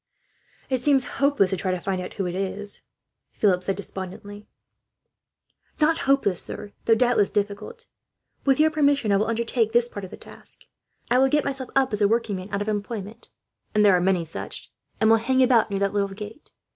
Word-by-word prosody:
"It 260 -2 -1
seems 270 -1 +3 0.2
hopeless 280 -9 +3
to 190 - 0
try 185 - -2
to 185 -1 0
find 185 +1 -2
out 180 - -7
who 195 - -2
it 175 - -3
is," 195 +2 -4 0.5
Philip 185 -4 +2
said 195 +1 -2
despondently. 200 +1 -7 1.3
"Not 325 +2 +3
hopeless, 205 -10 +2
sir, 205 - -7
though 225 - +5
doubtless 240 -3 +3
difficult. 210 - -3 0.6
With 275 +1 +3
your 315 +1 +5
permission, 285 -7 +2
I 200 - +4
will 210 +2 0
undertake 230 0 0
this 240 0 +3
part 205 -4 -8
of 190 - -7
the - - -10
task. - - -12 0.5
I 250 - +5
will 265 0 +4
get 295 +2 +2
myself 270 -2 -4
up 265 -3 +2
as 210 - -2
a 205 - +5
workman 205 -4 -1
out 200 +1 -1
of - - -11
employment 215 +1 -4 0.5
and 210 0 +5
there 195 -2 +6
are 180 - +2
many 180 -2 +1
such 160 - -8 0.3
and 220 - +3
will 225 0 +6
hang 260 +4 +2
about 240 -4 +4
near 200 - -2
that 200 0 0
little 200 -1 +1
gate. 210 +7 -10
210 Hz, 195 wpm, -24 LUFS, 195-255 Hz, 1.3 s, there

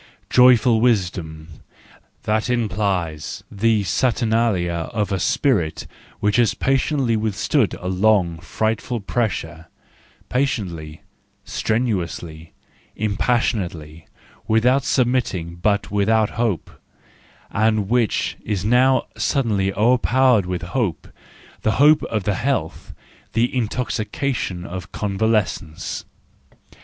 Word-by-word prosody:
"Joyful 125 -2 +5
Wisdom": 85 - -1 0.6
that 110 +2 0
implies 95 -9 -2
the 110 +1 +1
Saturnalia 110 -7 0
of 105 -2 -2
a 95 - 0
spirit 90 - 0 0.3
which 105 +1 +1
has 120 -3 +3
patiently 135 -2 +1
withstood 110 +3 0
a 90 - -6
long, 95 -3 +2
frightful 110 +6 -2
pressure— 90 -7 -3 0.6
patiently, 90 - -2 0.4
strenuously, 85 -8 -2 0.5
impassionately, 100 -7 -1 0.4
without 125 +5 +3
submitting, 120 -11 0
but 100 +3 0
without 105 +1 +2
hope—and 110 0 -3
which 120 -1 0
is 100 -3 -2
now 125 +4 +3
suddenly 105 -8 0
o'erpowered 120 0 +3
with 90 0 -3
hope, 90 - -2 0.5
the 110 - +1
hope 150 +2 +5
of 105 -4 -3
health, 110 - -2 0.4
the 120 +3 +1
intoxication 115 -4 -2
of 95 0 -7
convalescence. 100 -5 -1
105 Hz, 90 wpm, -21 LUFS, 90-120 Hz, 0.6 s, Joyful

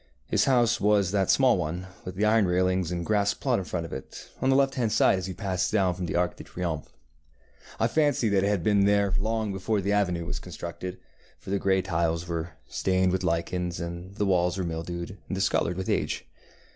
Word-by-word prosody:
His - - +2
house 120 -3 +3
was 100 -3 +3
that 100 -2 +1
small 130 -7 +4
one, 85 +2 -3 0.2
with 90 - -6
the 105 +3 +1
iron 110 -2 +4
railings 90 -1 +1
and 85 -1 -3
grass 100 -1 +2
plot 125 -5 0
in 95 - -5
front 85 -2 -3
of - - -8
it, 65 - -9
on 130 - +2
the 135 - +4
left 135 0 +3
hand 120 -5 0
side 95 - +4
as 95 - -4
you 95 - -5
pass 95 -4 -1
down 95 -4 +2
from 90 0 -4
the - - -3
Arc 90 -1 0
de - - -9
Triomphe. 85 -4 -4 0.9
I 115 - +3
fancy 145 -2 +2
that 100 -1 +2
it - - +2
had 100 -4 0
been 100 0 +3
there 100 -1 +3
long 110 0 -1
before 100 +3 -1
the 100 +1 -1
avenue 90 -5 +1
was - - -4
constructed, 90 +2 -7 0.4
for - - -9
the 100 - +1
grey 95 -1 +2
tiles 85 -1 -1
were 85 0 -4
stained 95 -1 +1
with 95 +1 -1
lichens, 85 0 -1
and 85 +3 -6
the 105 - 0
walls 90 -1 +2
were 95 - -1
mildewed 85 +3 -5
and - - -3
discoloured 90 -2 +1
with 95 - -3
age. - - -1
95 Hz, 220 wpm, -27 LUFS, 90-105 Hz, 0.9 s, small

